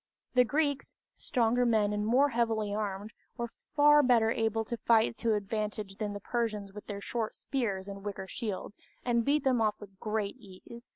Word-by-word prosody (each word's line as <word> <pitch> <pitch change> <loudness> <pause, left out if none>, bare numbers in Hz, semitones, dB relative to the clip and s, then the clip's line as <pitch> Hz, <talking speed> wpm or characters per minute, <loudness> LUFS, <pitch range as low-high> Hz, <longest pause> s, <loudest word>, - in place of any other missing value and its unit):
The 250 -1 +6
Greeks, 285 +2 -1 0.2
stronger 245 0 +1
men 215 -3 +2
and 210 0 -1
more 265 +5 +4
heavily 225 -4 0
armed, 205 0 -3 0.2
were 235 -1 -3 0.2
far 295 0 +7
better 235 -4 +4
able 225 -1 0
to 235 - -4
fight 225 0 +3
to 225 -2 +1
advantage 210 -1 -3
than 210 -2 -3
the 205 - -5
Persians 215 -4 -2
with 210 - -10
their 200 -1 -5
short 225 0 -3
spears 205 -8 -2
and 200 0 -8
wicker 195 -2 -5
shields, 210 -1 -5 0.3
and 235 -2 +2
beat 290 +4 +2
them 255 -3 +2
off 215 -1 +1
with 195 -2 -13
great 215 -2 -2
ease. 230 +2 -13
220 Hz, 180 wpm, -30 LUFS, 205-240 Hz, 0.3 s, far